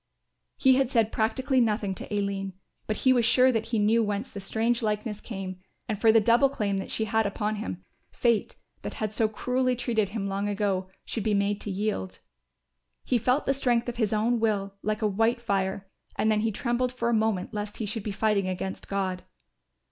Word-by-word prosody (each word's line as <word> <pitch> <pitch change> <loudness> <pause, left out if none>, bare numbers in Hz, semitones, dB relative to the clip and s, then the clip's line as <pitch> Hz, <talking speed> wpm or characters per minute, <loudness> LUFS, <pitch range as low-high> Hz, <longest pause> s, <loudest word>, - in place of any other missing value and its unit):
He 260 -1 +5
had 270 -2 +2
said 225 -4 +2
practically 255 +4 +1
nothing 210 -3 +1
to 190 - -9
Aline, 200 -1 -2 0.3
but 215 - 0
he 260 - +7
was 245 -2 +3
sure 255 +3 +5
that 225 -3 -1
he 230 -1 -1
knew 215 +2 +3
whence 210 +2 -2
the 200 - -6
strange 225 +5 0
likeness 210 -1 -2
came; 190 -4 -6 0.3
and 215 -2 -3
for 225 - +7
the 225 - +6
double 235 +5 +4
claim 200 -7 -1
that 195 - -6
she 220 - -1
had 220 -1 +1
upon 210 +1 -2
him, 95 - -5 0.2
fate, 235 -3 +1 0.3
that - - -6
had 215 -1 -3
so 220 0 +2
cruelly 250 +3 0
treated 230 -4 0
him 205 -1 -3
long 200 +1 -1
ago, 195 -2 -1 0.2
should 225 - -3
be 210 0 +1
made 200 +1 0
to - - -5
yield. 200 -1 -2 0.9
He 245 - +1
felt 250 +5 +1
the 275 - +2
strength 245 -3 +1
of 240 - -6
his 220 -4 +1
own 225 +2 +2
will 205 -3 0
like 215 +1 -2
a - - +4
white 225 +4 +1
fire 195 -3 -1 0.3
and 220 +1 +2
then 215 - +2
he 220 +1 +1
trembled 240 +3 0
for 250 -2 -2
a - - +2
moment 220 -3 0
lest 210 0 -4
he 220 - -3
should 220 +2 -3
be 210 - -4
fighting 200 -1 +1
against 185 +1 -4
God. 190 -2 -2
215 Hz, 210 wpm, -27 LUFS, 200-235 Hz, 0.9 s, he